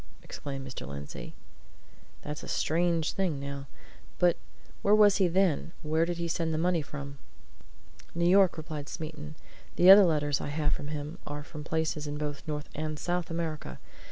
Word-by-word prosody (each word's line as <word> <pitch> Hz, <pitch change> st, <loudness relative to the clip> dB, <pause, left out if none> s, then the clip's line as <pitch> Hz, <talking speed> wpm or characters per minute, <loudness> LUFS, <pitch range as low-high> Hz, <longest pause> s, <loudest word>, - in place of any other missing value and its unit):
exclaimed 135 Hz, -2 st, -6 dB
Mr. 130 Hz, -, -7 dB
Lindsey. 70 Hz, -3 st, -7 dB, 0.9 s
"That's 150 Hz, 0 st, -5 dB
a -, -, -9 dB
strange 165 Hz, 0 st, +1 dB
thing, 180 Hz, -7 st, -1 dB
now. 140 Hz, 0 st, -6 dB, 0.5 s
But 175 Hz, -1 st, +4 dB, 0.5 s
where 205 Hz, +1 st, +5 dB
was 205 Hz, -2 st, +6 dB
he 190 Hz, -2 st, +4 dB
then? 175 Hz, -2 st, +1 dB
Where 160 Hz, +2 st, +2 dB
did 175 Hz, 0 st, -3 dB
he 170 Hz, 0 st, -2 dB
send 165 Hz, -1 st, -1 dB
the -, -, 0 dB
money 175 Hz, 0 st, +2 dB
from?" 140 Hz, -1 st, -8 dB, 1.0 s
"New 170 Hz, 0 st, +1 dB
York," 190 Hz, -1 st, +5 dB
replied 155 Hz, -2 st, -6 dB
Smeaton. 155 Hz, -1 st, -7 dB, 0.4 s
"The 180 Hz, +2 st, +8 dB
other 200 Hz, 0 st, +10 dB
letters 145 Hz, -4 st, +1 dB
I -, -, -4 dB
have 150 Hz, 0 st, 0 dB
from 145 Hz, -, -4 dB
him 150 Hz, +3 st, -5 dB
are 145 Hz, 0 st, -5 dB
from 150 Hz, 0 st, -9 dB
places 160 Hz, -1 st, -1 dB
in 145 Hz, 0 st, -4 dB
both 150 Hz, -1 st, -4 dB
North 150 Hz, -1 st, -3 dB
and 155 Hz, 0 st, -3 dB
South 175 Hz, +2 st, -2 dB
America. 160 Hz, -, -4 dB
155 Hz, 170 wpm, -29 LUFS, 145-170 Hz, 1.0 s, other